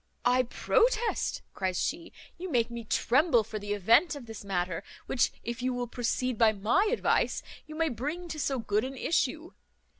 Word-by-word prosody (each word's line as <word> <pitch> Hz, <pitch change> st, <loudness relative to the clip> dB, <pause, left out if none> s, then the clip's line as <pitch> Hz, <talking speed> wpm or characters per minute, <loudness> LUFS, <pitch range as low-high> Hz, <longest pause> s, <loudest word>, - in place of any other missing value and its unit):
"I 250 Hz, +1 st, +5 dB
protest," 470 Hz, -, +1 dB
cries 185 Hz, -2 st, -1 dB
she, 335 Hz, +3 st, -2 dB, 0.3 s
"you 370 Hz, +1 st, -5 dB
make 240 Hz, -5 st, +1 dB
me 235 Hz, 0 st, -5 dB
tremble 250 Hz, +2 st, +3 dB
for 215 Hz, 0 st, -6 dB
the 205 Hz, 0 st, -3 dB
event 230 Hz, -, +4 dB
of 280 Hz, -4 st, -8 dB
this 225 Hz, -2 st, -9 dB
matter, 185 Hz, -2 st, -2 dB, 0.2 s
which, 245 Hz, -, +1 dB
if 235 Hz, +1 st, -4 dB
you 255 Hz, 0 st, 0 dB
will 245 Hz, 0 st, -2 dB
proceed 245 Hz, 0 st, -2 dB
by 225 Hz, -2 st, +5 dB
my 235 Hz, -, +2 dB
advice, 485 Hz, -, +1 dB, 0.2 s
you 310 Hz, -, -8 dB
may 325 Hz, 0 st, +1 dB
bring 300 Hz, +9 st, -4 dB
to 310 Hz, -, -5 dB
so 275 Hz, -2 st, 0 dB
good 215 Hz, -2 st, 0 dB
an 265 Hz, +1 st, -5 dB
issue. 315 Hz, +3 st, 0 dB
245 Hz, 180 wpm, -29 LUFS, 220-310 Hz, 0.3 s, I